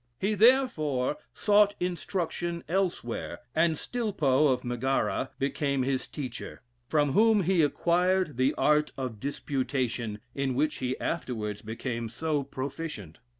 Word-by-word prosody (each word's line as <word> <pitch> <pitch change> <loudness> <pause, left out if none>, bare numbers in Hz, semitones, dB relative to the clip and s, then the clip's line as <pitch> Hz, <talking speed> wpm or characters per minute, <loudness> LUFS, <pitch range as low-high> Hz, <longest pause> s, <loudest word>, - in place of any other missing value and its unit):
He 205 +3 +1
therefore 185 - +3
sought 205 0 +4
instruction 175 -1 -2
elsewhere, 180 -9 -1 0.2
and 160 0 +3
Stilpo, 155 - +1
of 130 -2 +1
Megara, 130 +2 0
became 140 -1 0
his 130 0 -1
teacher, 130 -6 -7 0.2
from 145 -1 +2
whom 220 +4 +4
he 180 0 +3
acquired 175 +2 +2
the 130 +3 +2
art 150 0 +3
of 125 -5 -4
disputation, 130 -4 -2 0.2
in 135 -2 -1
which 150 +3 +1
he 130 0 -2
afterwards 110 -10 -3
became 115 +1 -4
so 150 +5 -1
proficient. 135 - -6
145 Hz, 120 wpm, -28 LUFS, 130-175 Hz, 0.2 s, sought